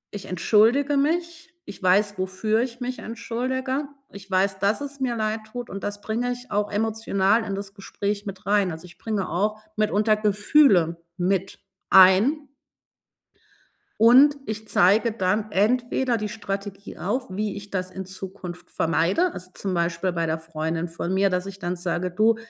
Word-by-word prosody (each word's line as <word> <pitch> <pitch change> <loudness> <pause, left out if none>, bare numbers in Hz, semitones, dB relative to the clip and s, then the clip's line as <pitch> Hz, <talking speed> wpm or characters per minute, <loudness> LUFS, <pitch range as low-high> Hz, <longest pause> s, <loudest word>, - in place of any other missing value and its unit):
ich 200 - -6
entschuldige 230 - +3
mich. 340 +5 -1
Ich 200 - -10
weiß, 200 +2 +2
wofür 200 +4 0
ich 245 0 -4
mich 250 0 -4
entschuldige. 260 +4 -3 0.3
Ich 200 0 -12
weiß, 190 +1 +1
dass 205 +5 +1
es 280 -1 -7
mir 250 -2 -1
leid 215 0 -1
tut 245 0 -6
und 195 +1 -6
das 205 0 -4
bringe 235 +4 -2
ich 245 +1 -8
auch 205 0 0
emotional 220 0 +1
in 195 -2 -3
das 200 0 -7
Gespräch 200 +1 -4
mit 190 -1 -8
rein. 200 -2 +2
Also, 160 +2 -8
ich 175 0 -16
bringe 210 -4 -2
auch 210 +5 -1 0.2
mitunter 215 0 +2
Gefühle 205 - +3 0.2
mit 190 +1 -1 0.3
ein. 205 +11 +6 1.5
Und 260 +6 +7
ich 215 0 -5
zeige 210 +6 +4
dann 210 +1 -1
entweder 240 +4 +1
die 210 - -3
Strategie 200 -1 -6
auf, 250 +8 -2
wie 205 +2 -3
ich 200 0 -9
das 185 -1 -3
in 190 0 -6
Zukunft 185 -2 -8
vermeide. 185 - +1
Also, 180 0 -9
zum 195 -2 -3
Beispiel 170 +2 0
bei 170 -1 -1
der 160 0 -1
Freundin 160 +1 -3
von 170 +2 -3
mir, 195 +1 +3
dass 180 0 -1
ich 195 0 -8
dann 175 +1 -2
sage: 175 +1 -2
„Du, 215 +5 +3
205 Hz, 165 wpm, -24 LUFS, 185-230 Hz, 1.5 s, Und